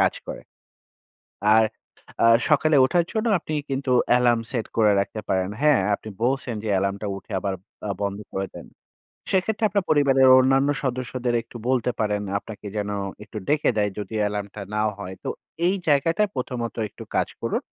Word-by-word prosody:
কাজ -, -, +3 dB
করে। -, -, -6 dB, 1.1 s
আর 110 Hz, -, +6 dB, 0.6 s
অ্যা 115 Hz, -, +6 dB, 0.2 s
সকালে 155 Hz, +1 st, +4 dB
ওঠার 170 Hz, +6 st, +2 dB
জন্য 220 Hz, +1 st, -1 dB
আপনি 155 Hz, -1 st, -5 dB, 0.2 s
কিন্তু 135 Hz, -1 st, -1 dB, 0.2 s
অ্যালার্ম 120 Hz, -2 st, +4 dB
সেট 120 Hz, -4 st, -2 dB
করে 110 Hz, -2 st, +5 dB
রাখতে 105 Hz, +2 st, -3 dB
পারেন। 95 Hz, 0 st, 0 dB
হ্যাঁ, 150 Hz, -7 st, +5 dB
আপনি 110 Hz, -, -8 dB, 0.2 s
বলছেন 130 Hz, -2 st, 0 dB
যে 110 Hz, -, -2 dB
অ্যালার্মটা 100 Hz, +2 st, 0 dB
উঠে 100 Hz, -, -11 dB
আবার 95 Hz, 0 st, -2 dB, 0.3 s
আ 100 Hz, -, 0 dB
বন্ধ 100 Hz, 0 st, -2 dB
করে 95 Hz, 0 st, -2 dB
দেন। -, -, -9 dB, 0.7 s
সেক্ষেত্রে 205 Hz, +4 st, +1 dB
আপনার 200 Hz, -3 st, 0 dB
পরিবারের 135 Hz, -3 st, +5 dB
অন্যান্য 135 Hz, +2 st, +3 dB
সদস্যদের 125 Hz, -1 st, -2 dB
একটু -, -, -11 dB
বলতে 125 Hz, -2 st, +2 dB
পারেন 105 Hz, -1 st, 0 dB, 0.2 s
আপনাকে 105 Hz, -1 st, -10 dB
যেন 105 Hz, 0 st, -2 dB, 0.3 s
একটু 105 Hz, +1 st, -9 dB
ডেকে 150 Hz, 0 st, +2 dB
দেয় 105 Hz, -1 st, +1 dB
যদি 105 Hz, +2 st, -6 dB
অ্যালার্মটা 105 Hz, 0 st, -3 dB
না 105 Hz, -, +1 dB, 0.2 s
হয়। 95 Hz, -2 st, -7 dB
তো -, -, -3 dB, 0.4 s
এই 190 Hz, -, +2 dB
জায়গাটা 165 Hz, +6 st, +3 dB
প্রথমত 125 Hz, -2 st, -3 dB
একটু -, -, -11 dB
কাজ -, -, +1 dB
করুন। -, -, -1 dB
120 Hz, 165 wpm, -24 LUFS, 105-140 Hz, 1.1 s, আর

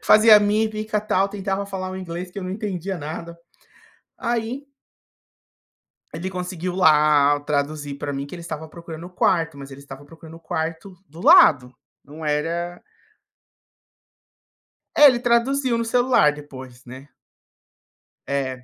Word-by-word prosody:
Fazia 215 Hz, 0 st, +7 dB
mímica, 215 Hz, +1 st, 0 dB
tal, 200 Hz, -2 st, 0 dB
tentava 195 Hz, 0 st, -3 dB
falar 190 Hz, -1 st, -5 dB
o 185 Hz, -, -6 dB
inglês, 180 Hz, 0 st, -6 dB
que 200 Hz, -, -8 dB
eu -, -, -6 dB
não 185 Hz, -, -5 dB
entendia 195 Hz, -2 st, -4 dB
nada 165 Hz, +2 st, -7 dB, 0.8 s
Aí 235 Hz, +3 st, -3 dB, 1.5 s
Ele 170 Hz, +4 st, -4 dB
conseguiu 180 Hz, -1 st, -5 dB
lá 150 Hz, -4 st, +4 dB
traduzir 145 Hz, 0 st, -3 dB
para 145 Hz, 0 st, -5 dB
mim 140 Hz, 0 st, -4 dB
que 140 Hz, -, -9 dB
ele 170 Hz, -, -9 dB
estava 160 Hz, -1 st, -7 dB
procurando 170 Hz, +1 st, -10 dB
o -, -, -14 dB
quarto, 165 Hz, -3 st, 0 dB
mas 140 Hz, 0 st, -10 dB
ele 135 Hz, -, -10 dB
estava 140 Hz, 0 st, -12 dB
procurando 160 Hz, +1 st, -14 dB
o -, -, -18 dB
quarto 165 Hz, +3 st, -5 dB
do 160 Hz, +4 st, -12 dB
lado, 185 Hz, -, +6 dB, 0.3 s
não 150 Hz, +3 st, -11 dB
era 165 Hz, +4 st, -2 dB, 2.2 s
É, 295 Hz, -, +9 dB
ele 255 Hz, -3 st, +3 dB
traduziu 245 Hz, +1 st, +1 dB
no 230 Hz, -, -1 dB
celular 245 Hz, -, +3 dB
depois, 130 Hz, -4 st, -12 dB
né. 130 Hz, +3 st, -12 dB, 1.2 s
É, 130 Hz, -2 st, -3 dB
170 Hz, 140 wpm, -22 LUFS, 150-205 Hz, 2.2 s, É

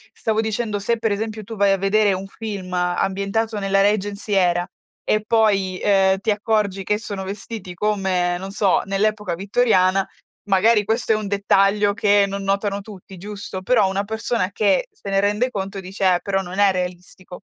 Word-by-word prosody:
Stavo 220 Hz, 0 st, 0 dB
dicendo, 220 Hz, -1 st, -2 dB
se 230 Hz, +4 st, 0 dB
per 225 Hz, -1 st, -1 dB
esempio 215 Hz, +1 st, -3 dB
tu 225 Hz, +3 st, -8 dB
vai 200 Hz, -1 st, +3 dB
a 195 Hz, -, +3 dB
vedere 200 Hz, +1 st, +2 dB
un 190 Hz, +1 st, -5 dB
film 200 Hz, -3 st, -7 dB
ambientato 195 Hz, +5 st, -1 dB
nella 195 Hz, 0 st, +2 dB
Regency 205 Hz, +1 st, 0 dB
Era 175 Hz, -2 st, +2 dB, 0.4 s
e 215 Hz, 0 st, +1 dB
poi, 200 Hz, -5 st, +1 dB
uhm, 195 Hz, -1 st, +3 dB
ti 220 Hz, +2 st, 0 dB
accorgi 205 Hz, -2 st, 0 dB
che 210 Hz, +2 st, 0 dB
sono 205 Hz, -3 st, -6 dB
vestiti 195 Hz, -1 st, -7 dB
come, 185 Hz, -2 st, 0 dB
non 190 Hz, +2 st, -7 dB
so, 200 Hz, -2 st, +2 dB
nell'epoca 210 Hz, -1 st, -1 dB
vittoriana, 195 Hz, -1 st, +2 dB, 0.4 s
magari 210 Hz, +2 st, +3 dB
questo 225 Hz, +3 st, 0 dB
è -, -, +2 dB
un 215 Hz, -1 st, -3 dB
dettaglio 200 Hz, +1 st, +2 dB
che 205 Hz, -2 st, +3 dB
non 200 Hz, 0 st, -5 dB
notano 200 Hz, +1 st, -1 dB
tutti, 195 Hz, -2 st, -12 dB
giusto, 200 Hz, 0 st, -7 dB
però 210 Hz, 0 st, +3 dB
una 195 Hz, +1 st, -1 dB
persona 220 Hz, -2 st, -2 dB
che 215 Hz, -, +1 dB
se 200 Hz, -, -9 dB
ne 195 Hz, 0 st, +2 dB
rende 210 Hz, +5 st, +1 dB
conto 195 Hz, -3 st, -5 dB
dice: 190 Hz, +1 st, -7 dB
"Eh, -, -, -1 dB
però 195 Hz, -1 st, -1 dB
non 185 Hz, +1 st, -6 dB
è 200 Hz, -1 st, +5 dB
realistico." 180 Hz, 0 st, -6 dB
200 Hz, 180 wpm, -21 LUFS, 190-215 Hz, 0.4 s, è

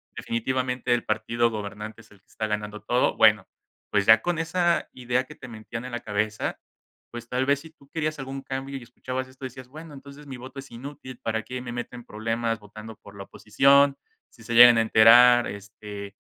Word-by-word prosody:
definitivamente 125 Hz, +1 st, -1 dB
el 120 Hz, -, -1 dB
partido 115 Hz, +2 st, 0 dB
gobernante 105 Hz, 0 st, -7 dB
es 110 Hz, -, -22 dB
el 100 Hz, -, -19 dB
que -, -, -50 dB
está 110 Hz, -, -4 dB
ganando 105 Hz, 0 st, -4 dB
todo". 125 Hz, +4 st, +1 dB
Bueno, 105 Hz, -3 st, +5 dB, 0.4 s
pues 100 Hz, -1 st, +1 dB
ya 110 Hz, +1 st, +7 dB
con 175 Hz, +4 st, -1 dB
esa 170 Hz, +1 st, 0 dB
idea 125 Hz, 0 st, -1 dB
que 150 Hz, -, -13 dB
te 130 Hz, -, -11 dB
metían 115 Hz, +1 st, -8 dB
en 125 Hz, -, -7 dB
la 120 Hz, -, -3 dB
cabeza, 105 Hz, 0 st, -2 dB, 0.5 s
pues 120 Hz, 0 st, -9 dB
tal 130 Hz, +1 st, 0 dB
vez 140 Hz, 0 st, +1 dB
si 160 Hz, -, -12 dB
tú 140 Hz, -3 st, -24 dB
querías 155 Hz, -1 st, -3 dB
algún 135 Hz, 0 st, -6 dB
cambio 135 Hz, +1 st, -5 dB
y 130 Hz, -, -10 dB
escuchabas 130 Hz, +2 st, -6 dB
esto 130 Hz, +1 st, -11 dB
decías: 130 Hz, 0 st, -9 dB
"Bueno, 155 Hz, +2 st, -11 dB
entonces 140 Hz, +1 st, -13 dB
mi 135 Hz, -, -7 dB
voto 130 Hz, +2 st, -10 dB
es 135 Hz, -, -11 dB
inútil, 130 Hz, +1 st, -9 dB
¿para 110 Hz, -1 st, -2 dB
qué 125 Hz, +3 st, -6 dB
me 125 Hz, -1 st, -7 dB
meto 120 Hz, +1 st, -6 dB
en 120 Hz, -, -10 dB
problemas 115 Hz, +1 st, -2 dB
votando 110 Hz, +1 st, -11 dB
por 100 Hz, -, -15 dB
la 100 Hz, -, -7 dB
oposición? 140 Hz, +7 st, +3 dB, 0.3 s
Si 115 Hz, -, -18 dB
se 115 Hz, -, -5 dB
llegan 120 Hz, 0 st, +9 dB
a -, -, +4 dB
enterar, 120 Hz, +2 st, +6 dB
este, 100 Hz, 0 st, -9 dB
120 Hz, 205 wpm, -25 LUFS, 110-135 Hz, 0.5 s, llegan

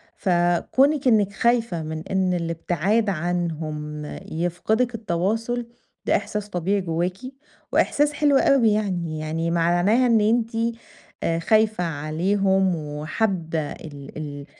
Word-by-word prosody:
فكونك 195 Hz, -, +2 dB
إنك 205 Hz, -4 st, +3 dB
خايفة 230 Hz, -8 st, +1 dB
من 155 Hz, +1 st, -5 dB
إن 190 Hz, -1 st, +1 dB
الابتعاد 175 Hz, +5 st, 0 dB
عنهم 155 Hz, -4 st, -3 dB, 0.3 s
يفقدك 175 Hz, +9 st, 0 dB
التواصل، 225 Hz, +5 st, -1 dB, 0.4 s
ده -, -, +3 dB
إحساس 210 Hz, 0 st, -3 dB
طبيعي 195 Hz, +2 st, 0 dB
جواكِ 175 Hz, +2 st, -2 dB, 0.5 s
وإحساس 295 Hz, +1 st, +2 dB
حلو 285 Hz, -2 st, +3 dB
أوي 245 Hz, -7 st, +4 dB
يعني، 175 Hz, -7 st, -2 dB
يعني 165 Hz, +2 st, -2 dB
معناها 175 Hz, +9 st, +3 dB
إن 225 Hz, -2 st, +4 dB
أنتِ 225 Hz, +2 st, +2 dB, 0.7 s
آآ، 165 Hz, 0 st, 0 dB
خايفة 215 Hz, 0 st, +2 dB
عليهم 185 Hz, +5 st, +1 dB
وحابة 160 Hz, +3 st, -2 dB
ال 145 Hz, -2 st, -10 dB
ال 145 Hz, -2 st, -6 dB
180 Hz, 110 wpm, -23 LUFS, 165-220 Hz, 0.7 s, أوي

